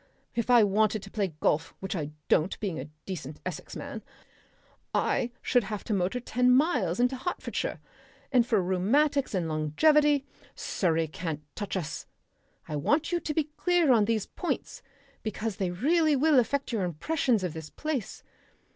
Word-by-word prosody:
If 235 0 -2
I 240 -2 +7
wanted 210 +1 +2
to 195 - -10
play 195 -7 -2
golf 160 +2 +1
which 190 +1 -4
I 150 -4 -2 0.2
don't, 160 +5 +2
being 190 -8 -3
a 130 - -5 0.2
decent 155 -6 -6
Essex - - -6
man - - -6 0.9
I 240 - +1
should 245 -4 +2
have 210 0 -4
to 220 - -2
motor 195 +5 0
ten 250 +1 +1
miles 250 - +3
into 250 +2 +3
Hertfordshire. 350 +8 -3 0.5
And 250 -3 +5
for 220 -5 +1
rheumatics 245 +9 +2
and 175 -3 0
longevity 280 - +3 0.3
Surrey 165 -3 0
can't 155 -1 -5
touch 205 -2 -3
us. 160 -4 -5 0.6
I 150 - -3
want 290 - +1
you 350 - +1
to 305 - -3
be 310 -2 0
clear 350 -5 +3
on 220 -4 +5
these 220 -2 0
points, 355 - -4 0.4
because 215 -1 -3
they 190 -2 0
really 305 - +3
will 290 0 +5
affect 275 +3 0
your 220 -5 0
impressions 220 - 0
of 180 -4 -2
this 160 -2 -7
place.... 290 -9 -4
215 Hz, 165 wpm, -28 LUFS, 180-275 Hz, 0.9 s, I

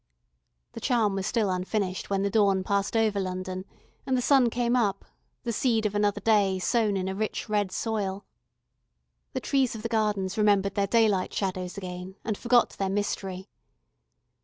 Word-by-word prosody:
The - - -9
charm 230 -6 +2
was 195 0 -2
still 215 -5 +1
unfinished 185 +1 -2
when 195 -1 0
the 200 - 0
dawn 195 -3 +3
passed 200 +2 0
over 215 -2 +2
London, 185 0 -4 0.4
and 260 -1 0
the - - +1
sun 265 -3 +5
came 240 +1 0
up, 205 -5 0 0.4
the 235 -2 -2
seed 225 -1 +1
of 210 - 0
another 205 0 +1
day, 200 -3 +3
sown 210 +1 +1
in 185 0 -2
a 190 - -2
rich 215 +2 -3
red 205 -3 0
soil. 200 -2 -2 1.1
The - - -2
trees 270 -4 +1
of 215 - -7
the 230 - -2
Gardens 210 -3 0
remembered 200 -2 +3
their 200 -1 0
daylight 210 -4 +2
shadows 185 -1 -3
again, 180 0 -7
and 215 - -1
forgot 240 +2 +3
their 195 -1 -2
mystery. 195 -1 -3
205 Hz, 170 wpm, -27 LUFS, 190-225 Hz, 1.1 s, sun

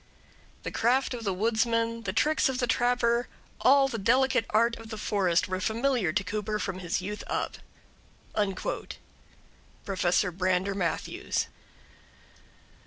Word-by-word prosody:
The - - -4
craft 255 +4 +2
of 235 -2 -5
the 195 - +1
woodsman, 230 +3 +1
the - - 0
tricks 310 -1 +2
of 260 - -2
the 250 - +1
trapper, 240 0 +2 0.3
all 275 +1 +5
the 235 -4 -4
delicate 245 +2 +3
art 230 +2 +3
of 225 -1 -11
the 220 - -6
forest, 190 -5 +1
were 185 0 -3
familiar 230 -3 +1
to 185 +4 0
Cooper 210 +2 -2
from 195 -3 -3
his 175 0 -2
youth 210 +2 -5
up. - - -2 0.8
Prof. 195 -2 -3
Brander 185 +1 +1
Matthews. 175 -5 -2
220 Hz, 130 wpm, -28 LUFS, 190-240 Hz, 0.8 s, all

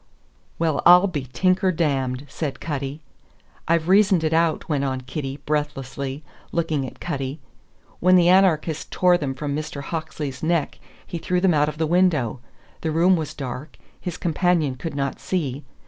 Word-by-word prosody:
"Well, 160 -3 +1
I'll 180 +2 +8
be 150 -9 -3
tinker 185 +4 +2
dammed!" 135 -5 -1
said 145 0 -4
Cutty. 140 -1 -4 0.7
"I've 165 -1 +2
reasoned 190 -2 +4
it 155 0 +1
out," 165 -1 +1
went 145 -3 0
on 130 -2 -2
Kitty, 135 +1 -5
breathlessly, 140 -1 -3 0.3
looking 160 -5 -1
at - - -12
Cutty, 140 -2 -4 0.6
"When 185 +1 +5
the 175 -1 +5
anarchist 175 -4 +3
tore 180 -1 +3
them 135 -3 -3
from 140 +1 -3
Mr. 150 -2 -5
Hawksley's 150 -3 -5
neck, 165 -2 0 0.3
he 170 - -5
threw 180 +2 0
them 180 -1 +3
out 150 0 +3
of 150 - -8
the 160 - +1
window. 155 -8 +2 0.4
The 160 - -1
room 170 +4 +4
was 160 -3 -4
dark; 135 +2 -6 0.2
his 180 -2 -5
companion 170 -4 +1
could 140 +5 -6
not 140 -1 -2
see. 145 -6 -2
155 Hz, 165 wpm, -23 LUFS, 140-175 Hz, 0.7 s, I'll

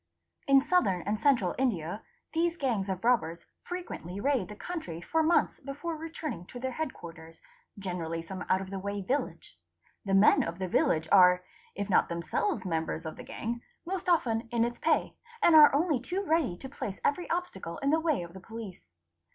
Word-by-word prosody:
| 85 - -42
In' 275 -1 +6
Southern 240 - +2
and 210 +1 -1
Central 240 -11 +3
India 200 -6 -1 0.3
these 335 +1 +1
gangs 225 - -1
of 190 -1 -3
robbers 175 -9 +1 0.2
frequently 275 - -6
raid 255 -4 +1
he 210 - -8
country 260 - -5
for 320 - 0
months 320 +2 +2
before 290 +4 -5
returning 315 - -5
to 245 - -9
their 260 +1 -2
head 310 +2 -3
quarters—generally 165 +1 -7
some 185 +2 -6
out 185 - +3
of 190 0 -7
the 195 - -3
way 200 +1 -4
village. 270 +9 -3 0.4
The 195 -1 +1
men 195 +2 +6
of 170 +1 -3
the 190 -1 -3
village 160 -2 +2
are, 180 -2 +7 0.3
if 200 0 -3
not 200 - +3
them 170 0 -3
selves 190 +7 -1
members 160 -1 -2
of 160 - -5
the - - -9
gang, 235 +1 -4 0.2
most 365 +1 -3
often 235 -9 +2
in 235 -1 +2
its 240 0 -4
pay, - - +1 0.3
and 345 -6 +5
are 300 -2 +10
only 300 -1 +2
too 365 +10 -3
ready 310 - +1
to 265 - -7
place 215 -7 -6
every 345 +5 0
obstacle 330 - -3
in 275 +1 0
the 320 - +4
way 310 - 0
of 170 0 -10
the 190 - -9
police. 215 - -9
220 Hz, 190 wpm, -30 LUFS, 180-300 Hz, 0.4 s, are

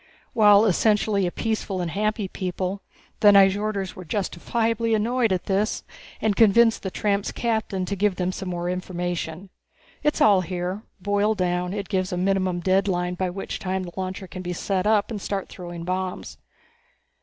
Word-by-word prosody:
While 210 -1 +6
essentially 210 -1 +2
a - - -2
peaceful 215 -3 -2
and 175 -2 -2
happy 210 +2 -1
people, 185 +1 -3 0.4
the 210 - +4
Nyjorders 200 0 +4
were 185 - -9
justifiably 225 +5 -1
annoyed 230 +1 +1
at 185 -1 -1
this 205 +3 0 0.4
and 215 -2 +1
convinced 225 +2 +5
the 190 - -3
tramp's 200 +1 -1
captain 220 -5 -1
to 200 - -3
give 200 0 +1
them 180 0 -1
some 185 0 -5
more 175 -1 -3
information. 180 0 -4 0.5
It's 300 0 +1
all 205 -9 +5
here. 180 +2 -3 0.2
Boiled 205 +2 +1
down, 180 0 0
it 200 0 -4
gives 185 -2 -1
a 180 - -2
minimum 185 -1 0
deadline 185 -1 +1
by 185 0 -1
which 195 +2 -5
time 190 0 -2
the 175 -1 -8
launcher 190 +1 -4
can 185 0 -8
be 180 -1 -4
set 190 +2 -1
up 215 0 +2
and 210 -3 -4
start 195 -1 -3
throwing 175 -2 -8
bombs." 185 +1 -4
195 Hz, 165 wpm, -24 LUFS, 180-210 Hz, 0.5 s, While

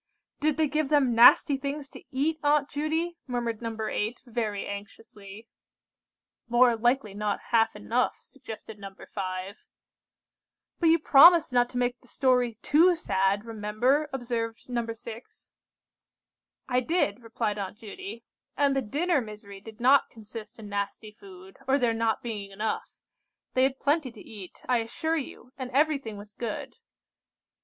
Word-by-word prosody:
"Did 305 0 +1
they 315 -1 +3
give 305 0 -1
them 285 -5 +3
nasty 245 +4 +7
things 280 +1 -4
to - - -12
eat, 305 +5 0
Aunt 290 -1 +3
Judy?" 320 +4 -2
murmured 235 -3 -2
No. 230 -1 -4
8, 215 +2 -2
very 220 -4 -3
anxiously. 200 +1 -9 1.0
"More 240 0 +5
likely 240 -2 +1
not 205 0 -2
half 225 -2 +3
enough," 230 +4 0
suggested 220 -5 -11
No. 195 -1 -9
5. 190 0 -6 1.1
"But 335 - +3
you 330 - +6
promised 320 0 +7
not 245 0 +3
to 250 - -6
make 245 0 0
the 250 - -21
story 250 -3 +2
too 345 +4 +5
sad, 200 - 0
remember!" 230 +7 0
observed 235 -3 -4
No. 240 -2 -2
6. 230 +1 -11 1.2
"I 250 -1 +2
did," 250 - 0
replied 225 -2 -3
Aunt 195 +1 -5
Judy, 235 - -9 0.3
"and 280 -1 +3
the 270 - +1
dinner 290 +7 +1
misery 210 -3 -10
did 220 +2 -12
not 265 +4 +5
consist 220 0 -10
in 220 -2 -9
nasty 205 +1 -4
food, 190 -2 -14
or 270 +1 +4
there 240 -4 +2
not 225 -1 0
being 210 -4 -5
enough. 210 +3 -4 0.6
They 255 - +2
had 265 0 +2
plenty 290 -2 +1
to 215 - -13
eat, 200 -5 -11
I 250 -2 +3
assure 315 +8 -2
you, 255 -3 -7
and 255 -1 -4
everything 275 -5 +1
was 205 0 -12
good. 230 -3 -5
235 Hz, 150 wpm, -27 LUFS, 210-275 Hz, 1.2 s, nasty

